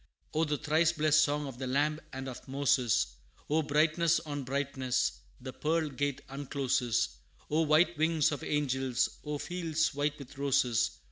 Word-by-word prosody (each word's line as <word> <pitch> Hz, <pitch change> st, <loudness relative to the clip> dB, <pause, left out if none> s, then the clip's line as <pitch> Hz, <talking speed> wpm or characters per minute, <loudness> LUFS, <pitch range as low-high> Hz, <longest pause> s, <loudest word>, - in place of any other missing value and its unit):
O 160 Hz, +1 st, +2 dB
the 150 Hz, -1 st, -1 dB
thrice 155 Hz, +2 st, +2 dB
blessed 155 Hz, -1 st, +4 dB
song 145 Hz, 0 st, 0 dB
of 130 Hz, -3 st, -8 dB
the 130 Hz, -, -3 dB
Lamb 150 Hz, +4 st, +1 dB
and 135 Hz, 0 st, -6 dB
of 130 Hz, +1 st, -8 dB
Moses! 135 Hz, -3 st, +2 dB, 0.5 s
O 160 Hz, +1 st, +3 dB
brightness 155 Hz, +3 st, +2 dB
on 145 Hz, -3 st, -5 dB
brightness! 130 Hz, -2 st, 0 dB, 0.3 s
the 130 Hz, 0 st, -7 dB
pearl 160 Hz, 0 st, 0 dB
gate 145 Hz, -1 st, -2 dB
uncloses! 130 Hz, -, -1 dB, 0.3 s
O 155 Hz, +2 st, +3 dB
white 160 Hz, +3 st, +4 dB
wings 160 Hz, -1 st, +3 dB
of 145 Hz, -, -4 dB
angels! 130 Hz, -4 st, 0 dB
O 150 Hz, -1 st, -3 dB
fields 160 Hz, -1 st, -1 dB
white 145 Hz, +1 st, -1 dB
with 140 Hz, -1 st, -11 dB
roses! 125 Hz, -4 st, +2 dB
145 Hz, 155 wpm, -31 LUFS, 130-155 Hz, 0.5 s, blessed